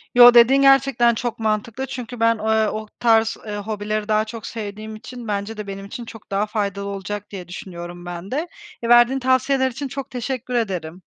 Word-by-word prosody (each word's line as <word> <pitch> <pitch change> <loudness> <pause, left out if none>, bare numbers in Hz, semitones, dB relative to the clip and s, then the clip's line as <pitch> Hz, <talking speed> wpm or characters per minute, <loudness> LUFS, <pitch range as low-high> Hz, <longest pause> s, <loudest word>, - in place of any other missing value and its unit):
Yo, 245 0 +10
dediğin 245 +3 +6
gerçekten 270 -3 +5
çok 240 0 -3
mantıklı 220 +3 -1
çünkü 250 -2 -7
ben, 230 0 +4
eee, 220 0 +2
o 215 0 -5
tarz, 225 -2 +3
eee, 210 -1 -4
hobileri 210 0 -3
daha 215 0 +2
çok 220 0 -8
sevdiğim 215 0 -6
için 240 +2 -9
bence 205 +1 -3
de 210 -1 -6
benim 195 0 -6
için 235 +4 -7
çok 225 -2 -13
daha 200 +2 +1
faydalı 200 -2 -2
olacak 200 +1 -5
diye 185 -4 -8
düşünüyorum 175 -1 -8
ben 175 +2 -7
de. 305 +6 -1 0.4
Verdiğin 240 +3 +5
tavsiyeler 260 +1 +2
için 275 +4 -5
çok 275 +1 -6
teşekkür 250 0 -4
ederim. 185 -7 -2
220 Hz, 185 wpm, -22 LUFS, 205-245 Hz, 0.4 s, Yo